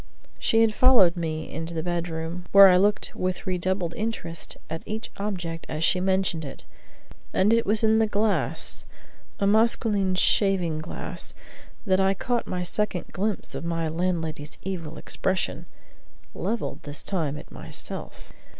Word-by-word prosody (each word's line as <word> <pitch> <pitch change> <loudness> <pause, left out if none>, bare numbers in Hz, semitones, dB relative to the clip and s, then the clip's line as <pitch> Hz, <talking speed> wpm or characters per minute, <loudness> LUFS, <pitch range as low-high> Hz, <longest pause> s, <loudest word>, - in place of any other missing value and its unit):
She 225 - +3
had 225 -1 +4
followed 225 -9 +6
me 160 -2 -3
into 165 +1 -4
the 160 - -2
bedroom, 170 0 -3
where 200 -1 +10
I 180 - +6
looked 205 +2 +2
with 185 0 -2
redoubled 185 -1 -1
interest 215 -7 -4
at 160 - -5
each 220 +1 -5
object 180 -5 -4
as 155 +1 -2
she 180 - +3
mentioned 185 -3 +1
it, 140 - -7 0.7
and 205 +4 +4
it 230 0 +2
was 215 +2 +3
in 220 0 +4
the 220 - +3
glass 210 0 -1 0.5
a 200 - +1
masqueline 210 -2 +3
shaving 185 -4 +3
glass 155 - -6 0.5
that 190 -2 +3
I 195 0 +3
caught 240 +4 -1
my 180 -1 -2
second 190 0 -1
glimpse 205 +1 -2
of - - -5
my 165 -1 -1
landlady's 160 -3 -2
evil 170 -5 -5
expression 190 0 -2 0.7
levelled 235 - -3
this 145 0 -5
time 155 -7 -1
at - - -11
myself. - - -7
185 Hz, 150 wpm, -26 LUFS, 165-205 Hz, 0.7 s, where